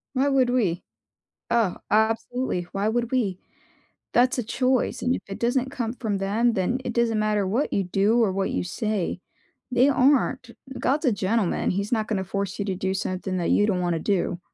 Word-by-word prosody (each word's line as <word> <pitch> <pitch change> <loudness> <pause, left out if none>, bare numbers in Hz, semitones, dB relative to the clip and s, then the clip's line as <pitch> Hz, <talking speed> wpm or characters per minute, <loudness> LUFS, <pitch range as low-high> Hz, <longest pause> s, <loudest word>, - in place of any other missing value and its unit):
Why 270 +2 +2
would 265 -3 +3
we? 205 -9 +1 0.7
Oh, 230 -6 +2
absolutely, 225 0 +1
why 200 +2 0
would 235 +1 -1
we? 210 -8 0 0.8
That's 250 +3 +3
a 245 - 0
choice, 255 +3 0
and 250 +1 +1
if - - -3
it 195 - -6
doesn't 250 +2 0
come 245 -5 -3
from 220 -5 -3
them, 215 +5 +1
then 195 +7 0
it - - -2
doesn't 230 -2 +1
matter 210 -1 +1
what 230 +10 0
you 195 - +1
do 200 +6 +2
or 205 - +2
what 195 0 -1
you - - -1
say. 195 0 -2 0.5
They 250 +2 +4
aren't. 260 -2 +2 0.3
God's 290 +4 +1
a 255 - +4
gentleman, 200 0 0
he's 200 +2 -2
not 220 -3 +1
gonna 200 -4 -1
force 195 0 -3
you 200 - -1
to 195 -2 -2
do 190 +1 -1
something 185 0 -3
that 175 -2 -1
you 205 - +3
don't 185 -4 0
wanna 175 -2 0
do. 180 -1 -1
220 Hz, 195 wpm, -25 LUFS, 195-245 Hz, 0.8 s, They